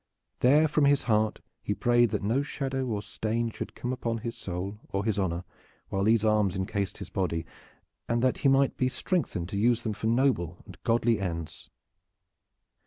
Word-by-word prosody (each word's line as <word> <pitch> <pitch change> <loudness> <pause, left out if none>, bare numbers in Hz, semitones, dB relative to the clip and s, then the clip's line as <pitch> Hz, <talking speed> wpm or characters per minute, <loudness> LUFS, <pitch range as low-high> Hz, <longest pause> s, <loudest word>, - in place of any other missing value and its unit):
There 145 +5 +5
from 150 -1 +2
his 140 0 +4
heart 110 -2 +1 0.2
he 105 - -2
prayed 120 +1 +3
that - - -2
no 115 +7 +2
shadow 135 -2 -3
or 105 -3 -2
stain 115 +2 -2
should - - -7
come 125 +1 -3
upon 115 -2 -2
his 115 +1 -5
soul 95 +3 -5
or 100 +1 -2
his 110 -2 0
honor 85 -2 -1 0.5
whilst 95 +1 +1
these 110 -1 +4
arms 105 -3 +3
incased 95 +1 -2
his - - -8
body, 85 -4 -1 0.6
and 115 +1 +1
that 130 - +2
he - - +2
might 135 0 +3
be 130 - +2
strengthened 125 - -1
to 100 - -2
use 120 +1 +3
them 110 - -1
for 110 - -3
noble 115 - +1
and - - -13
godly 115 -1 +2
ends. 85 -4 -5
110 Hz, 180 wpm, -28 LUFS, 100-125 Hz, 0.6 s, There